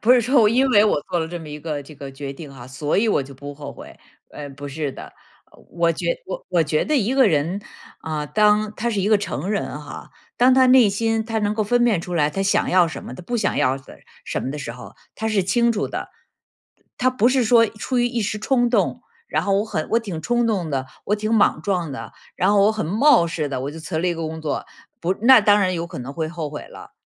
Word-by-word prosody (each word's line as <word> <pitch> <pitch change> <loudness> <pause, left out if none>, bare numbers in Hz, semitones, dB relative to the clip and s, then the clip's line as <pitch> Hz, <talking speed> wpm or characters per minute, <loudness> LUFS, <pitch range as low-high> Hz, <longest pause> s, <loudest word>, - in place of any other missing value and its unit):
不 240 +3 +5
是 250 - +5
说 250 +2 +3
我 210 - +5
因 255 +4 +3
为 210 -2 +6
我 205 - +2
做 175 - +1
了 160 0 -2
这 175 0 -5
么 160 -2 -10
一 150 0 -7
个 150 -2 -4
这 155 +3 -13
个 140 -1 -8
决 135 0 -7
定 140 -1 -10
哈， 125 -2 -11
所 145 +3 -2
以 220 +3 +3
我 145 - +2
就 135 +1 -11
不 145 +2 -9
后 145 -1 -8
悔， - - -13 0.3
呃， 145 -1 -8
不 145 +1 -8
是 145 0 -3
的。 - - -10 0.6
我 170 -1 +1
觉 - - -5 0.2
我 - - -6
我 170 -2 +2
觉 155 0 0
得 305 - +1
一 245 +2 +1
个 260 -5 +5
人， 165 +5 0 0.4
啊， 155 -2 -3
当 210 +4 +2
他 235 +2 -2
是 210 -4 -1
一 205 - +1
个 215 -2 +4
成 185 -2 -4
人 200 -7 -2
哈， 145 - -10 0.3
当 255 +1 +5
他 260 0 +5
内 250 -4 +6
心 225 +2 0
他 225 0 -2
能 205 0 0
够 215 0 0
分 240 +3 +2
辨 215 -8 +2
出 175 +1 -6
来 150 -2 +2
他 195 +5 -2
想 195 - +1
要 180 -2 +4
什 - - -8
么， 125 - -8
他 - - -9
不 240 +7 -3
想 - - 0
要 130 +1 +2
的 135 - -14 0.3
什 - - -3
么 130 - -3
的 150 - -5
时 125 -4 -5
候， 125 - -12 0.2
他 220 0 -3
是 205 -3 +1
清 235 +6 +2
楚 210 -2 -1
的。 - - -5 0.9
他 255 +1 +3
不 250 -1 +2
是 255 -1 +2
说 230 0 +5
出 225 +4 -3
于 240 - +3
一 240 -2 -2
时 210 +1 -2
冲 245 +1 +1
动， - - 0 0.2
然 - - -1
后 195 -1 +1
我 210 - 0
很 155 -8 -3
我 230 - +4
挺 185 -9 -6
冲 240 +5 +1
动 185 -8 -1
的， 130 -1 -2 0.2
我 210 - 0
挺 215 +2 -1
莽 200 -7 +3
撞 180 -6 -1
的， - - -8 0.2
然 185 - +2
后 200 -1 +4
我 215 +2 +4
很 215 -7 -3
冒 225 - +4
失 155 -3 -3
地 130 -2 -3
我 140 +2 -4
就 160 +1 -9
辞 160 0 -4
了 180 - 0
一 175 - 0
个 165 -1 -4
工 160 0 -6
作， 155 -2 -3 0.4
不 175 +2 0
那 255 -1 +8
当 205 0 +4
然 185 -1 +1
有 170 0 -3
可 - - -8
能 130 +3 -6
会 160 +1 -3
后 165 -3 -5
悔 150 - -7
了。 - - -13
190 Hz, 285 characters per minute, -22 LUFS, 155-225 Hz, 0.9 s, 那